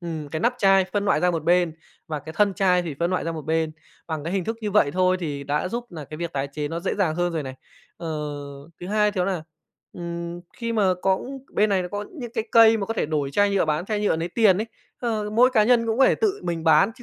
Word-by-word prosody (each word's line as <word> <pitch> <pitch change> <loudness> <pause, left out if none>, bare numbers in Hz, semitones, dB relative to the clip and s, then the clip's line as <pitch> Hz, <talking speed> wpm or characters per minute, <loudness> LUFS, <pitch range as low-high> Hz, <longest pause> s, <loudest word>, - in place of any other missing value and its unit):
ừm, 160 -4 -5
cái 155 +2 -4
nắp 240 +6 +2
chai 195 -1 +5
phân 205 -1 0
loại 205 - +2
ra 180 - +3
một 165 -3 -2
bên 175 -1 +3 0.3
và 155 -2 -3
cái 160 +2 -9
thân 205 -2 +3
chai 180 -2 +3
thì 165 -4 -5
phân 170 +1 +1
loại 185 - -1
ra 165 - -2
một 160 -1 -6
bên. 160 +1 0 0.4
Bằng 155 -3 -4
cái 170 - -3
hình 190 -2 -1
thức 225 +4 -3
như 210 -2 -2
vậy 200 -8 +3
thôi 185 +1 +2
thì 145 -4 -4
đã 145 +5 -1
giúp 235 +4 -4
nà 155 -3 -7
cái 155 - -9
việc 170 +1 -4
tái 140 0 -2
chế 150 0 -3
nó 165 +2 -4
dễ 190 - -1
dàng 180 -6 +1
hơn 175 +1 0
rồi 160 -2 -2
này. 130 -1 -7 0.4
Ờ, 170 - -6 0.7
thứ 175 - -6
hai 210 +1 +2
thì 200 - -5
đó 180 - +2
là, 180 -4 -2 0.5
ừm, 170 0 -6 0.2
khi 230 -1 -3
mà 200 -5 +3
có 190 0 +2 0.3
bên 215 - +3
này 190 -2 +2
nó 180 - -5
có 205 +2 -4 0.2
những 240 -2 -6
cái 220 - -1
cây 225 -1 +7
mà 200 -3 -3
có 225 - -3
thể - - 0
đổi 145 -3 -1
chai 205 +7 +3
nhựa 200 -1 +2
bán, 155 +2 -1
chai 210 -1 -1
nhựa 205 -5 +2
lấy 165 +2 -3
tiền 195 -1 +4
ấy, 220 - -2 0.3
ơ, 220 -3 -2
mỗi 240 +4 +5
cá 220 -5 +4
nhân 235 0 +3
cũng 225 +1 -1
có 270 - +7
thể - - +4
tự 415 -2 0
mình 165 -2 -3
bán 160 +5 +5
chứ 245 - -15
180 Hz, 280 wpm, -24 LUFS, 160-210 Hz, 0.7 s, cây